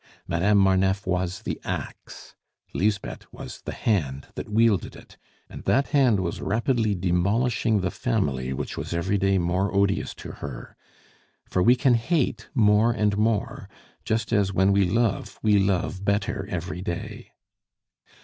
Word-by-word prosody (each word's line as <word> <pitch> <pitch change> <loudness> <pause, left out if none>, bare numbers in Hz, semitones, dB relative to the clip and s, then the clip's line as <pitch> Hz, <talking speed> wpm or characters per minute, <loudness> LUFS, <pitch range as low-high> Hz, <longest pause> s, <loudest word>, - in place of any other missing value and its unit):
Madame 100 +5 +2
Marneffe 95 +1 +2
was 90 +2 -2
the - - -4
axe, - - -7 0.4
Lisbeth 100 +1 -2
was - - -9
the - - -3
hand 70 - -1
the - - -5
wielded 110 -3 +2
it, - - -15 0.3
and - - -10
that 135 +2 +2
hand 130 -9 +3
was 85 -2 -3
rapidly 110 0 0
demolishing 105 +5 +1
the 90 -1 -1
family 70 - -1
which 65 - -4
was - - -4
every 95 +4 0
day 95 0 +2
more 90 +3 0
odious 100 0 +1
to - - -8
her; 65 -4 -8 0.7
for 90 - -1
we 120 +6 +6
can 125 0 +3
hate 120 -2 0
more 110 0 +4
and 105 -3 +1
more, 110 0 -1 0.3
just 110 +1 -1
as, 100 -3 +2
when 95 +1 +3
we 100 -1 +4
love, 115 +1 0
we 105 -2 +4
love 95 0 0
better 100 0 -1
every 90 +1 -4
day. 85 -2 -6
100 Hz, 150 wpm, -25 LUFS, 90-110 Hz, 0.7 s, we